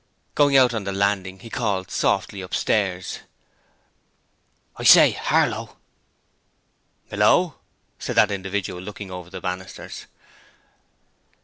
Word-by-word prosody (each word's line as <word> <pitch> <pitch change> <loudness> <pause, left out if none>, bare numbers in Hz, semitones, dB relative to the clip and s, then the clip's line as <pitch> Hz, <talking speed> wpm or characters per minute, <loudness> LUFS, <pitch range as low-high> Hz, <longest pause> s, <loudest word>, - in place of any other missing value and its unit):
Going 145 -2 +4
out 125 -2 +5
on 110 -3 -3
the 100 - -3
landing 95 -1 -1
he 115 -1 -11
called 100 -6 -2
softly 100 - 0
upstairs. 95 0 -1 1.6
'I - - -6
say, - - +8
Harlow.' - - -1 1.3
'Hallo,' 130 - +2 0.4
said - - -4
that 105 - +4
individual, 95 -2 -4
looking 100 0 -8
over 90 -1 -8
the 95 0 -8
banisters. 95 0 -7
100 Hz, 105 wpm, -23 LUFS, 95-105 Hz, 1.6 s, say